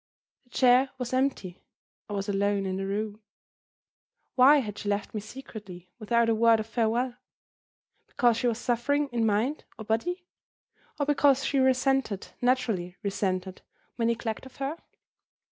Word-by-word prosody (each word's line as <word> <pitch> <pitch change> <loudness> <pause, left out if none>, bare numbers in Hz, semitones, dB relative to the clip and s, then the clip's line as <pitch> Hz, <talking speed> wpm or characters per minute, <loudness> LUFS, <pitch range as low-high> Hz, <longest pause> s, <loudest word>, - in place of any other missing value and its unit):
The - - -30
chair 255 +2 +4
was 250 -1 -4
empty. 255 -9 -1 0.5
I - - -4
was 200 0 -3
alone 200 0 0
in 190 0 -2
the 195 0 -3
room. 210 +2 -3 1.1
Why 275 +4 +7
had 210 -7 -3
she 205 - -4
left 205 0 -2
me 215 - -3
secretly, 205 -6 -10
without 235 +1 +2
a 230 - +3
word 225 0 +4
of 215 - -3
farewell? 240 +2 0 0.9
Because 240 -2 +2
she 245 - 0
was 230 -2 0
suffering, 275 +5 0
in 235 -3 0
mind 225 +8 0
or 220 - -8
body? 350 - -1 0.7
Or 285 - +1
because 280 -2 +3
she 275 0 +1
resented, 260 -5 +1
naturally 225 -8 0
resented, 190 -2 -2 0.3
my 230 - -1
neglect 230 +1 -2
of 265 - -17
her? 275 +3 -3
230 Hz, 150 wpm, -27 LUFS, 205-260 Hz, 1.1 s, Why